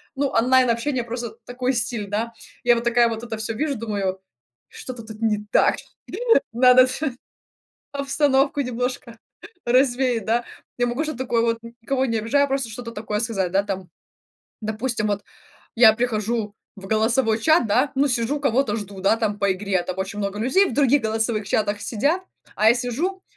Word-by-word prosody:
ну, 280 +1 +1
онлайн-общение, 250 +1 +2
просто 235 -1 -6
такой 250 +1 -1
стиль, 220 -2 -2
да. 225 +3 -2 0.3
Я 240 0 +5
вот 235 - -2
такая 235 0 +4
вот 225 +1 -5
это 225 -2 -5
всё 220 +1 -3
вижу, 290 +4 -1
думаю: 200 -4 -2 0.5
"Что-то 245 -3 -8
тут 220 0 -11
не 210 -2 0
так, - - +4 0.8
надо 250 +2 +6 1.1
обстановку 280 0 +1
немножко 250 -2 -4 0.5
развеять", 250 -2 +2
да, 235 +1 +1 0.3
я 245 - +2
могу 250 +6 -1
что-то 310 -5 -5
такое 240 -3 +1
вот, 230 0 0 0.2
никого 265 +2 0
не 230 -2 0
обижая, 280 +6 +2
просто 270 -3 -1
что-то 230 +1 -7
такое 210 -1 -3
сказать, 205 -6 -1
да. 195 +2 +2
Там, 190 -3 -5 0.7
допустим, 220 0 -2
вот 205 0 -1 0.5
я 225 -2 +8
прихожу 220 -2 -1 0.2
в 195 -1 -10
голосовой 220 +2 +2
чат, 315 -1 +4
да, 250 +7 +2
ну, 275 +1 +2
сижу, 250 +4 0
кого-то 260 -5 +1
жду, 200 -3 -7
да, 195 +4 +3
там 210 -2 -1
по 200 -1 +2
игре, 190 -1 -1
там 185 +1 -5
очень 195 +2 -4
много 200 0 -3
людей 370 - +3
в - - -4
других 285 -1 +3
голосовых 220 -1 -1
чатах 205 0 0
сидят, 290 - 0 0.3
а 215 +1 +4
я 235 - +6
сижу, 290 +11 -2
230 Hz, 165 wpm, -23 LUFS, 215-255 Hz, 1.1 s, я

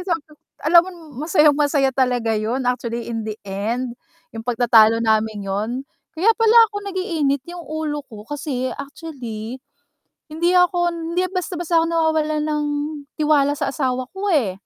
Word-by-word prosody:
sa 345 - +2
kanya 310 -1 -17 0.3
alam 340 +2 +7
mo - - -6 0.4
masayang 300 -4 +5
masaya 285 -2 +2
talaga 250 -3 +1
'yon 240 +5 -2
actually 240 -1 -2
in 225 -1 -2
the 215 -1 -4
end, 225 +6 -3 0.4
yung 225 - -6
pagtatalo 230 -2 +5
naming 220 -2 +1
yun 225 +7 -2 0.3
kaya 380 +8 +4
pala 455 0 +4 0.2
ako - - -5
nag-iinit 320 -8 -1
yung 350 0 -7
ulo 310 -1 -3
ko 215 -4 -11
kasi 260 -1 -3
actually 255 -6 -7 0.7
hindi 335 +3 +1
ako, 350 -1 +3
hindi 335 +2 -2
basta-basta 350 -2 0
ako - - +1
nawawalan 315 -2 +1
ng 300 -1 -1 0.5
tiwala 295 -2 +3
sa 275 - -1
asawa 255 -2 -1
ko, 390 +1 -3
eh. 235 - +2
280 Hz, 150 wpm, -21 LUFS, 235-325 Hz, 0.7 s, alam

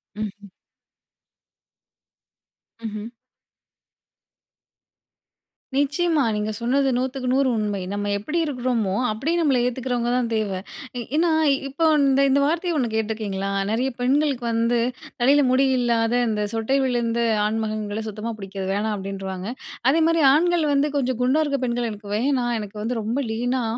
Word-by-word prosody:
ம், 215 0 -3
ம். 200 - -12 2.3
ம்ஹ்ம். 215 -1 -5 2.7
நிச்சியமா. 290 +2 +2
நீங்க 210 +1 -1
சொன்னது 270 +4 +1
100/100 260 +1 0
உண்மை. 210 -2 -1
நம்ம 205 0 -2
எப்படி 300 +12 -3
இருக்குறோமோ 245 -8 -1 0.2
அப்படியே 270 +11 -1
நம்மள 290 -6 +3
ஏத்துகரவங்கதான் 245 -1 -1
தேவை. 205 -4 -1 0.4
ஏ - - -2 0.2
ஏன்னா 330 +2 +3 0.4
இப்ப 275 +4 -12
வன் 300 -2 +4
இந்த 270 +1 +3
இந்த 275 +1 +4
வார்த்தைய 335 +3 0
ஒண்ணு 250 -5 0
கேட்டிருக்கிறீங்களா? 215 -3 -2 0.2
நிறைய 240 +5 0
பெண்களுக்கு 270 -1 +1
வந்து 230 +1 +1 0.4
தலையில 280 +4 +5
முடி 265 +2 +4
இல்லாத, 235 -2 +1
இந்த 215 -2 -1
சொட்டை 225 +4 +1
விழுந்த 235 -2 0 0.3
ஆண் 215 +1 0
மகன்கள 215 0 -3
சுத்தமா 215 +2 -4
பிடிக்காது 195 -1 -6
வேணாம் 210 +2 -1
அப்படின்றுவாங்க. 195 -1 -5 0.4
அதே 310 +5 +3
மாதிரி 330 0 +2
ஆண்கள் 340 +1 +3
வந்து, 280 +1 +3
"கொஞ்சம் 255 -3 -1
குண்டா 260 +5 +3
இருக்கிற 280 -3 -1
பெண்கள 240 0 -1
எனக்கு 205 -1 -9
வேணா. 255 +2 +1
எனக்கு 210 0 -8
வந்து 230 +2 -2
ரொம்ப 225 +4 -2
லீனா 245 +3 -1
240 Hz, 135 wpm, -23 LUFS, 215-275 Hz, 2.7 s, தலையில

